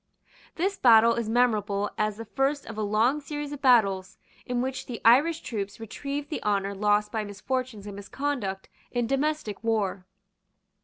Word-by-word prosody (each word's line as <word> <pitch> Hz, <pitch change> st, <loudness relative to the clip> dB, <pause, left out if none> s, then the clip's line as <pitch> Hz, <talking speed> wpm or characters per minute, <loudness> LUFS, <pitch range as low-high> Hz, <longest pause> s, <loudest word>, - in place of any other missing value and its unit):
This 390 Hz, +4 st, -1 dB
battle 230 Hz, -1 st, +7 dB
is 230 Hz, -2 st, -2 dB
memorable 210 Hz, -4 st, +1 dB
as 215 Hz, -1 st, -1 dB
the 230 Hz, -, -7 dB
first 275 Hz, +5 st, -1 dB
of 225 Hz, -, -8 dB
a 215 Hz, -, -3 dB
long 220 Hz, +8 st, +2 dB
series 290 Hz, 0 st, -5 dB
of 290 Hz, -1 st, -7 dB
battles 205 Hz, -7 st, +3 dB, 0.3 s
in 245 Hz, -1 st, -1 dB
which 260 Hz, +1 st, -3 dB
the 240 Hz, -3 st, -5 dB
Irish 295 Hz, +8 st, +5 dB
troops 200 Hz, -3 st, -5 dB
retrieved 280 Hz, +7 st, -5 dB
the -, -, -3 dB
honour 200 Hz, -1 st, 0 dB
lost 210 Hz, +1 st, +1 dB
by 220 Hz, -1 st, -1 dB
misfortunes 215 Hz, +2 st, -4 dB
and 205 Hz, -1 st, -7 dB
misconduct 200 Hz, -2 st, -3 dB, 0.2 s
in 240 Hz, -1 st, 0 dB
domestic 275 Hz, -5 st, -1 dB
war. 200 Hz, -5 st, -1 dB
225 Hz, 160 wpm, -27 LUFS, 205-270 Hz, 0.3 s, battle